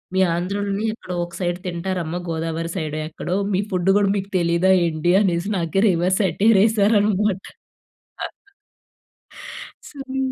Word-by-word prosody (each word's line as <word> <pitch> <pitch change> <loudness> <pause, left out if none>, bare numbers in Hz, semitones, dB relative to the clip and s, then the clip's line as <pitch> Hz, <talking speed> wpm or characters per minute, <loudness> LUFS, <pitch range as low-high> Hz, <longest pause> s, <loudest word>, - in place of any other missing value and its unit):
మీ - - +2 0.2
ఆంధ్రలోనే 200 +3 -2
ఎక్కడో 185 -5 -7
ఒక 175 - -15
సైడ్ 175 -1 -1
తింటారమ్మ 175 -1 -3
గోదావరి 165 +1 -3
సైడే 155 -2 -3
ఎక్కడో 175 +3 -4 0.2
మీ 190 - +2
ఫుడ్ 185 +1 +1
గూడా 205 -1 +3
మీకు 195 0 -4
తెలీదా 170 +2 +2
ఏంటి? 165 +1 0
అనేసి 180 0 0
నాకే 170 +3 0
రివర్స్ 180 +2 +1
సెటైర్ 195 +4 +3
ఎసారనమాట. 210 -2 +2 2.5
సరే 270 -2 -6
185 Hz, 120 wpm, -22 LUFS, 170-200 Hz, 2.5 s, గూడా